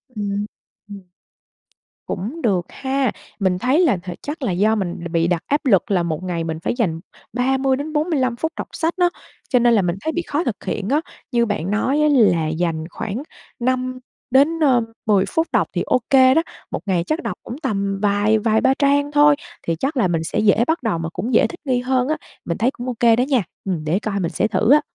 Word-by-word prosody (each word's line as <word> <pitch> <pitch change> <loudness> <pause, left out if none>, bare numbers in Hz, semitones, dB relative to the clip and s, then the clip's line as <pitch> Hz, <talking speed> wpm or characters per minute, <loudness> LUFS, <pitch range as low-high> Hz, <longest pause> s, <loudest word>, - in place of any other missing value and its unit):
Ừm, 205 -1 -2 0.4
ừm. 200 -1 -8 1.0
Cũng 230 - -4
được 190 -7 +1
ha, 265 -2 -1 0.3
mình 185 -2 +1
thấy 260 - +2
là 325 - +3
th 180 +1 -10
chắc 295 +2 -6
là 240 - 0
do 205 +5 +2
mình 185 -5 -2
đ - - -3
bị 165 -1 +2
đặt 170 -2 0
áp 290 +1 0
lực 210 -2 +3
là 180 -3 +2
một 165 0 -3
ngày 175 -2 -2
mình 160 -1 -4
phải - - -1
dành 170 -10 0 0.3
30-45 270 +2 0
phút 320 +7 -2
đọc - - -4
sách 330 +1 -1
nó, 355 -1 +4 0.4
cho 250 - +4
nên 240 0 +4
là 215 - +4
mình 175 -1 -1
thấy 315 - -1
bị 345 - -1
khó 305 0 -2
thực 235 - -4
hiện 205 0 -3
á. 295 +3 +2 0.3
Như 235 -1 +3
bạn 195 -4 -2
nói 260 +8 +1
á, 300 - +4
là 205 - +4
dành 160 0 -1
khoảng 220 +8 -5 0.4
5 255 +1 -1 0.3
đến, 285 +6 +4
ơ, 265 -6 +4 0.2
10 200 -3 +3
phút 325 +1 0
đọc - - +2
thì - - -1
ô 255 - +2
kê 260 -1 +6
đó, 325 - +4 0.3
một - - -2
ngày 185 -4 +1
chắc 315 +3 -1
đọc - - -2
cũng 245 - -7
tầm 200 -5 -1
vài 205 +1 +2
vài 220 0 +2
ba 265 - +4
trang 285 0 +2
thôi, 295 0 +5 0.3
thì 165 - +1
chắc 270 - -2
là 220 -7 +3
mình 165 -2 -1
sẽ - - -2
dễ 215 +2 +4
bắt 320 -3 0
đầu 220 -7 0
mà 165 0 -3
cũng 200 +9 -4
dễ - - +5
thích 350 - -10
nghi 255 -3 +1
hơn 255 0 +1
á, 310 +1 0 0.3
mình 170 - -2
thấy 245 +3 +2
cũng 245 -2 -8
ô 250 - -1
kê 230 -1 +5
đó 240 - +1
nha, 260 -5 +1 0.2
ừm, 180 -5 -2
để 165 +5 +1
coi 210 -2 -2
mình 170 -3 -1
sẽ - - +1
thử 215 +3 +2
á. 300 - +5
230 Hz, 230 wpm, -21 LUFS, 190-270 Hz, 1.0 s, kê